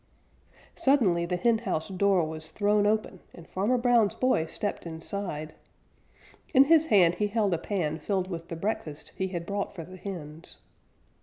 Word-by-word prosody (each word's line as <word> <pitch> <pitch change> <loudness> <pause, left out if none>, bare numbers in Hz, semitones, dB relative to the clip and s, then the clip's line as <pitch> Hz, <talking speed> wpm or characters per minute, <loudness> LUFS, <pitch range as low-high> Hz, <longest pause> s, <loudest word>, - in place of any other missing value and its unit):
Suddenly 195 -12 +2
the 180 - -1
henhouse 200 -4 0
door 190 -2 +2
was 155 0 -7
thrown 205 +3 +2
open 215 -3 -1 0.2
and 170 - -13
Farmer 210 +7 0
Brown's 240 -4 +3
boy 255 -11 +1
stepped 205 -2 -4
inside. 160 -2 -5 1.0
In 265 - +9
his 320 +2 +4
hand 180 - +5
he 210 - +3
held 205 -2 +1
a 165 - 0
pan 165 -5 -2
filled 185 +3 -1
with 170 -2 -6
the 165 - -5
breakfast 165 -5 -4
he 190 - -1
had 175 -2 -5
brought 200 +1 -3
for 165 - -6
the 185 +2 -11
hens. 165 -4 -8
190 Hz, 160 wpm, -28 LUFS, 165-210 Hz, 1.0 s, In